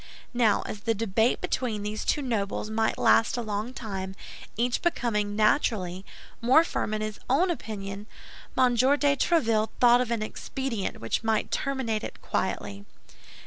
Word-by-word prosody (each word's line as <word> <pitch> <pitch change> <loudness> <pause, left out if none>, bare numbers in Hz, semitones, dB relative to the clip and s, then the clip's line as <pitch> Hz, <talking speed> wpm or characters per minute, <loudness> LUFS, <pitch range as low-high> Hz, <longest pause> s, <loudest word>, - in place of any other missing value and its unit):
Now, 230 -4 +3
as 210 - -6
the 225 +2 0
debate 225 +2 +1
between 220 -5 -2
these 210 +1 -3
two 295 - 0
nobles 215 -3 -2
might 220 0 +1
last 225 +2 +4
a 240 - -2
long 215 +2 -3
time, 195 -6 -5 0.4
each 240 +1 0
becoming, 210 -11 0
naturally, 210 -5 +1 0.4
more 260 +7 +6
firm 215 -9 -2
in 215 - -3
his 215 0 -4
own 340 +8 +3
opinion, 205 -7 -6 0.5
M. 250 -1 +4
de 245 +2 +3 0.3
Tréville 230 -10 +2
thought 245 0 +6
of 250 - -2
an 230 -2 -1
expedient 230 -1 -4
which 115 - -1
might 220 -1 0
terminate 260 -6 -1
it - - -7
quietly. 100 0 -3
225 Hz, 150 wpm, -27 LUFS, 210-245 Hz, 0.5 s, more